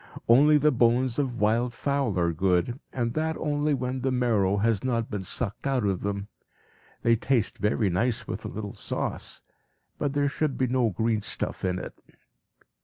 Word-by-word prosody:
Only 145 +6 +6
the 150 +1 +4
bones 120 0 +2
of 125 -4 -1
wild 115 +3 +1
fowl 140 -7 0
are 85 -1 +1
good, 95 - +1
and 120 -2 -2
that 160 0 -1
only 150 -1 0
when 130 0 -3
the 130 - 0
marrow 110 -6 +2
has 110 0 +1
not 115 -3 -1
been 105 -2 -2
sucked 105 +6 -3
out 130 -5 +1
of 95 -3 0
them. 100 0 -3 0.8
They 115 0 +4
taste 115 -1 0
very 105 -1 +1
nice 115 +7 0
with - - -5
a - - -4
little 105 0 -6
sauce, - - -4 0.6
but 145 -2 -1
there 145 0 +2
should 140 0 -1
be 130 - +2
no 125 -2 +2
green 110 +3 0
stuff - - -2
in 90 -1 0
it. - - -6
120 Hz, 180 wpm, -27 LUFS, 105-135 Hz, 0.8 s, Only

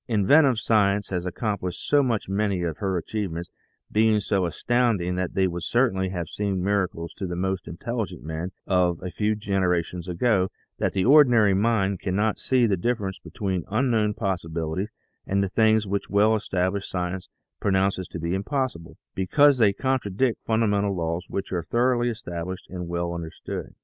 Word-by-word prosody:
Inventive 125 +5 +4
science 105 -3 +2
has 90 -1 -2
accomplished 95 -1 -3
so 145 -1 +5
much 120 -6 -1
many 100 -2 0
of 80 -3 -2
her 95 -2 -1
achievements 85 -2 -4 0.4
being 110 0 +4
so 95 -2 0
astounding 110 -1 +1
that 90 -1 -3
they 95 - +3
would 85 -1 -2
certainly 95 -4 +1
have 90 -3 -4
seemed 100 0 -2
miracles 95 -4 -1
to 95 - -3
the 90 - -4
most 95 0 -2
intelligent 110 - -4
men 80 +4 -4
of 90 -2 +2
a 90 - -4
few 105 +2 0
generations 90 -4 -1
ago 95 +1 +1 0.3
that - - 0
the 95 -1 +1
ordinary 120 -7 +6
mind 100 -1 +1
cannot 105 +3 0
see 130 -2 +2
the 105 -4 +2
difference 100 -2 -2
be - - -12
tween 95 -6 -2
unknown 110 -2 +1
possibilities 85 -1 -2 0.4
and 100 +1 +1
those 95 - -3
things 110 -1 +4
which 100 0 -2
well 105 +2 +4
established 95 -1 -1
science 90 0 -3 0.3
pronounces 95 -1 +1
to - - -7
be 85 +1 -2
impossible, 100 - -3 0.2
because 140 +9 +4
they 105 -3 +5
contradict 125 -1 0
fundamental 105 -3 +1
laws 85 +1 -2
which 100 - -4
are 90 - 0
thoroughly 120 +3 +1
established 90 -5 -5
and 90 -2 -5
well 85 0 -2
understood. 85 -2 -6
100 Hz, 165 wpm, -25 LUFS, 90-110 Hz, 0.4 s, ordinary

